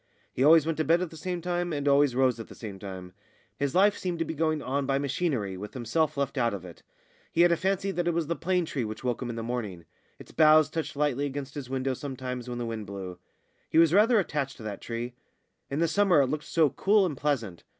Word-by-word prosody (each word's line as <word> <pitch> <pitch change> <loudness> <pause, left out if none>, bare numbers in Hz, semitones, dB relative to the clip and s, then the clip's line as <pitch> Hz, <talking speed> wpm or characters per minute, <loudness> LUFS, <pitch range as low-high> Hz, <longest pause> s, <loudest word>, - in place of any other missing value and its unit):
He 130 - 0
always 155 +1 +7
went 165 -1 -2
to - - +3
bed 165 +2 +3
at 180 - -6
the - - -11
same 175 +2 -4
time, 175 0 -1
and 145 -2 -2
always 140 -2 +4
rose 130 -2 +2
at 115 - -7
the - - -12
same 100 -4 -8
time. 95 -2 -8 0.5
His 140 +1 -1
life 200 +2 +5
seemed 180 -2 -3
to 165 - -1
be - - -4
going 155 0 0
on 140 0 -2
by 135 - +2
machinery 135 - -1
with 105 +5 -8
himself 145 +5 0
left 140 0 -1
out 115 -4 +1
of 95 -2 -8
it. 85 - -12 0.5
He 165 - +2
had 175 0 +6
a - - +4
fancy 195 +2 -1
that 175 -2 -2
it 175 - +2
was 170 -1 0
the 170 +3 -2
plane 180 +1 0
tree 140 -5 -3
which 110 +2 -6
woke 125 -1 -1
him 125 - -3
in 120 - -4
the 115 - -4
morning; 110 -8 -4 0.3
its - - -13
boughs 155 -1 +5
touched 160 -3 -3
lightly 145 -1 0
against 140 0 -6
his 140 -4 -7
window 135 0 -1
sometimes 125 -2 -5
when 120 - -4
the 120 - -3
wind 110 -3 -5
blew. 95 -3 -7 0.5
He - - 0
was 165 -1 +6
rather 220 +4 +5
attached 150 -7 -2
to 115 - -11
that 105 -2 -6
tree. 120 +1 -5 0.6
In 140 - -3
the 165 +1 +2
summer 180 -2 +4
it - - +3
looked 150 +1 -3
so 160 -5 +2
cool 200 +7 +3
and 160 -6 -2
pleasant. 120 - -2
140 Hz, 255 wpm, -28 LUFS, 120-165 Hz, 0.6 s, always